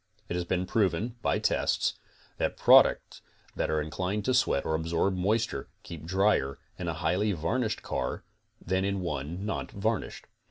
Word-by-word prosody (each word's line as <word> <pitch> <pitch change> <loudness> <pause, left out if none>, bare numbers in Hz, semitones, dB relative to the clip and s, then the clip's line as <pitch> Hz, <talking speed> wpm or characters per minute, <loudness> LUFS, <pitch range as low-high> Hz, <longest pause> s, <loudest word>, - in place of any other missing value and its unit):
It - - -2
has 90 0 -1
been 90 +1 0
proven, 105 +3 0
by - - +1
tests, - - +1 0.5
that - - -1
products - - +5 0.3
that - - -1
are 80 0 +1
inclined 90 +7 -2
to 130 - +2
sweat 95 - +2
or 80 - 0
absorb 85 +4 0
moisture, 105 -4 0 0.2
keep 80 -2 -9
drier 95 -7 +2 0.2
in 90 - -3
a 85 - -1
highly 90 +6 +1
varnished 105 +8 -1
car - - -3 0.4
than 95 +1 -1
in 100 -1 -1
one 85 +3 -4
not 110 - -3
varnished. 110 +1 -2
90 Hz, 160 wpm, -29 LUFS, 80-105 Hz, 0.5 s, products